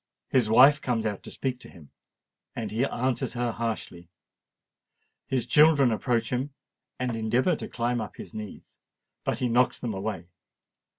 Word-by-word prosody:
His 125 Hz, -5 st, +2 dB
wife 135 Hz, +6 st, +7 dB
comes 115 Hz, -3 st, -1 dB
out 105 Hz, -3 st, -2 dB
to -, -, -10 dB
speak 130 Hz, -2 st, -3 dB
to -, -, -12 dB
him—and 80 Hz, -5 st, -12 dB
he 115 Hz, +5 st, +1 dB
answers 130 Hz, -1 st, -1 dB
her 120 Hz, -1 st, -1 dB
harshly: 110 Hz, -7 st, -4 dB, 1.2 s
his 130 Hz, -3 st, 0 dB
children 150 Hz, -2 st, +5 dB
approach 115 Hz, 0 st, 0 dB
him, 130 Hz, +3 st, -2 dB, 0.4 s
and 125 Hz, -2 st, -2 dB
endeavour 120 Hz, +10 st, +1 dB
to -, -, -6 dB
climb 120 Hz, 0 st, -1 dB
up 110 Hz, -, -7 dB
his -, -, -10 dB
knees—but 105 Hz, -1 st, -8 dB
he 125 Hz, -, 0 dB
knocks 120 Hz, +2 st, +2 dB
them 120 Hz, -3 st, -3 dB
away. 95 Hz, -2 st, -4 dB
120 Hz, 150 wpm, -27 LUFS, 110-130 Hz, 1.2 s, wife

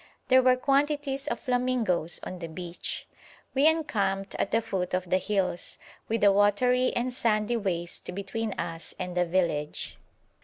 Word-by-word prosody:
There 260 Hz, 0 st, +7 dB
were 255 Hz, 0 st, +5 dB
quantities 280 Hz, +1 st, 0 dB
of -, -, -2 dB
flamingoes 245 Hz, -10 st, +1 dB
on 185 Hz, -, -6 dB
the 165 Hz, -, -5 dB
beach. 170 Hz, +1 st, -6 dB, 0.5 s
We 275 Hz, +3 st, +4 dB
encamped 200 Hz, -12 st, 0 dB
at -, -, +1 dB
the 225 Hz, -, +3 dB
foot 190 Hz, -5 st, -2 dB
of 185 Hz, 0 st, -2 dB
the 185 Hz, -, +4 dB
hills, 190 Hz, -2 st, -2 dB, 0.3 s
with 225 Hz, -1 st, -1 dB
a 200 Hz, -, +7 dB
watery 245 Hz, +6 st, +3 dB
and 245 Hz, +1 st, -1 dB
sandy 220 Hz, -1 st, +1 dB
waste 180 Hz, -3 st, -3 dB
between 200 Hz, +2 st, -3 dB
us 165 Hz, 0 st, -5 dB
and 180 Hz, -1 st, -4 dB
the 180 Hz, 0 st, +3 dB
village. 170 Hz, -4 st, -1 dB
205 Hz, 155 wpm, -28 LUFS, 180-250 Hz, 0.5 s, There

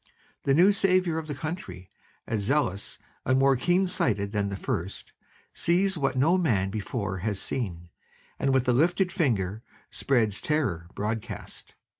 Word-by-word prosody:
The 135 Hz, -, +4 dB
new 180 Hz, +6 st, +6 dB
saviour 185 Hz, -4 st, +2 dB
of 160 Hz, -, -7 dB
the 145 Hz, -, -4 dB
country, 130 Hz, -, -6 dB, 0.4 s
as 110 Hz, -3 st, -1 dB
zealous 100 Hz, -4 st, 0 dB, 0.3 s
and 130 Hz, +1 st, +2 dB
more 135 Hz, 0 st, +4 dB
keen 175 Hz, +9 st, +2 dB
sighted 105 Hz, -, 0 dB
than 100 Hz, -2 st, 0 dB
the 100 Hz, -, -4 dB
first, 95 Hz, 0 st, -4 dB, 0.4 s
sees 190 Hz, +3 st, +3 dB
what 135 Hz, -5 st, 0 dB
no 165 Hz, +8 st, +4 dB
man 105 Hz, -, +1 dB
before 105 Hz, -2 st, -3 dB
had 100 Hz, +2 st, -1 dB
seen 90 Hz, -8 st, -3 dB, 0.5 s
and 135 Hz, -, +1 dB
with 130 Hz, -1 st, +2 dB
a 125 Hz, -, +4 dB
lifted 180 Hz, +7 st, +2 dB
finger 110 Hz, -, 0 dB, 0.3 s
spreads 110 Hz, -7 st, +1 dB
terror 115 Hz, -, -1 dB
broadcast. 110 Hz, +1 st, -5 dB
130 Hz, 150 wpm, -27 LUFS, 100-160 Hz, 0.5 s, new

